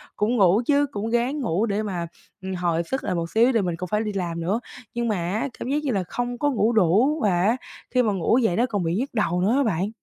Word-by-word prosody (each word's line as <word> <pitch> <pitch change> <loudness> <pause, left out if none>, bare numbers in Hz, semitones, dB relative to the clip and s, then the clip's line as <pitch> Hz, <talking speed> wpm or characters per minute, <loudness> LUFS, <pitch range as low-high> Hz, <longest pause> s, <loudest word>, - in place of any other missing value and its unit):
cũng 220 +4 +1
ngủ 195 +3 +4
chứ, 290 0 +3
cũng 210 +2 -3
ráng 245 +5 0
ngủ 210 -3 0
để 210 0 -1
mà, 175 -5 -3 0.3
ừm, 190 0 -4
hồi 170 -1 0
sức 265 +10 -3
lại 185 - -1
một 165 0 -2
xíu 235 +4 +4
tại 225 - +3
mình 175 -3 -2
cũng 180 -1 -5
phải 210 +1 +2
đi 210 -1 -3
làm 170 -3 -3
nữa. 195 +7 0 0.3
Nhưng 240 0 -1
mà 215 - +1
á 185 +9 -1
cảm 250 - -4
giác 290 - +1
như 270 - 0
là 195 -4 0
không 245 0 -3
có 290 +3 +1
ngủ 225 -1 +2
đủ, 220 - +3
và 180 -4 +2
á 225 +6 +2 0.3
khi 250 - +3
mà 210 -3 +1
ngủ 195 +6 +2
dậy 220 -9 +2
nó 240 - +3
còn 205 -7 -2
bị 165 +2 0
nhức 260 +5 -2
đầu 180 -5 0
nữa 210 +6 +2
á 280 - +3
bạn. 195 -2 0
210 Hz, 275 wpm, -24 LUFS, 180-240 Hz, 0.3 s, ngủ